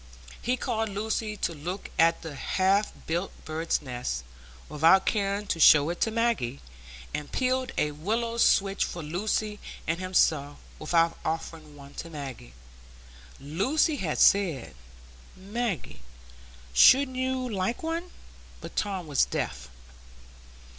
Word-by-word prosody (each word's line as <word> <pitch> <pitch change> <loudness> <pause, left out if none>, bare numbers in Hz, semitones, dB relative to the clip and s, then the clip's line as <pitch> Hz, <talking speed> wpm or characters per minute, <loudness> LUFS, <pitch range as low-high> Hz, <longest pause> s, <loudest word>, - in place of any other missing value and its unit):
He 250 +2 0
called 225 -4 -1
Lucy 215 +1 -2
to 170 - -1
look 175 +6 -6
at 165 0 +4
the 160 -2 -6
half 195 +8 +1
built 175 +4 -2
bird's 160 0 -1
nest 120 - -4 0.4
without 165 +6 +4
caring 200 -1 0
to 170 - -2
show 150 0 +7
it 200 +6 -1
Maggie, 230 - 0 0.5
and 150 -1 -5
peeled 255 0 0
a 150 - +1
willow 225 +10 -2
switch 200 -3 +3
for 175 - -5
Lucy 210 +6 -2 0.3
and 165 +2 -1
himself, 155 -6 +1 0.2
without 165 +1 +1
offering 160 -1 -5
one 140 0 -13
to 165 - -11
Maggie. 135 - -8 0.9
Lucy 200 - +1
had 165 - -2
said, 175 - +3 0.6
"Maggie, 195 - -4 0.7
shouldn't 260 - +6
you 260 0 -1
like 210 +3 -2
one?" 335 +2 -3 0.5
but - - -10
Tom 195 -4 -2
was 145 -3 +2
deaf. 60 0 -4
185 Hz, 125 wpm, -27 LUFS, 155-220 Hz, 0.9 s, show